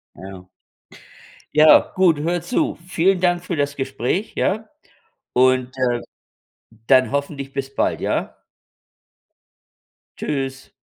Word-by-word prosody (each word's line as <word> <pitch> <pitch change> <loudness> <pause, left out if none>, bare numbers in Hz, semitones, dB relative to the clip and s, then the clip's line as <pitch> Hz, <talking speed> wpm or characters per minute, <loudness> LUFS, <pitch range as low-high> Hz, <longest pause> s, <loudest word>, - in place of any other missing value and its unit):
Ja. 95 -1 -10 1.1
Ja, 155 0 +6
gut, 180 -5 +4
hör 170 +2 -1
zu. 250 - -1
Vielen 185 +1 +2
Dank 175 0 +1
für 175 - -3
das 145 -1 -1
Gespräch, 135 - -2
ja? 215 +3 -1 0.7
Und, 130 0 +3
äh, 120 -2 +1 0.9
dann 130 -1 +4
hoffentlich 140 -1 -4
bis 135 0 -5
bald, - - -1
ja? - - -2 1.8
Tschüss. 135 -2 -4
140 Hz, 105 wpm, -21 LUFS, 130-175 Hz, 1.8 s, Ja